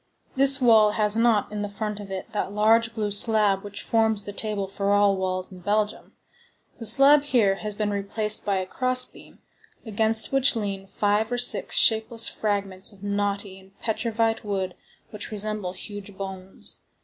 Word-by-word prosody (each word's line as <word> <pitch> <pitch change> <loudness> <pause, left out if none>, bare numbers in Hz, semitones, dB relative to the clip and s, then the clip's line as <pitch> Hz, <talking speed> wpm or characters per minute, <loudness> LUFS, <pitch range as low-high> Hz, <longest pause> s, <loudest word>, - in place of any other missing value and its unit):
This 275 +1 +7
well 220 -4 +5
has 210 -1 +1
not 225 -3 +2
in 205 -1 -4
front 210 0 -5
of 205 -1 -9
it 190 +3 -6
that 210 -2 -3
large 225 +2 +2
blue 210 -2 -2
slab 205 -2 +1
which 205 0 -7
forms 220 -2 +1
the 205 - -8
table 210 -2 -3
for 200 +1 -3
all 205 -1 +3
wells 185 0 -3
in 185 - -11
Belgium. 210 +3 -2 0.7
The 230 - -1
slab 275 +6 +6
has 290 - -10
here 205 -6 +2 0.2
been 210 -1 -1
replaced 210 +2 -2
by 200 - -1
a 185 -1 -2
cross 255 +5 +1
beam, - - -17 0.4
against 220 0 +2
which 270 -1 +2
lean 200 -3 -4
five 210 +3 0
or 245 - -1
six 245 - +3
shapeless 225 +1 +3
fragments 200 -2 -2
of 200 -1 -17
knotty 200 -1 -3
and 190 +1 -22
petrified 225 0 -1
wood 190 -3 -3 0.4
which 210 -2 -7
resemble 210 -3 -4
huge 205 0 -9
bones. 190 -1 -8
210 Hz, 170 wpm, -24 LUFS, 200-225 Hz, 0.7 s, This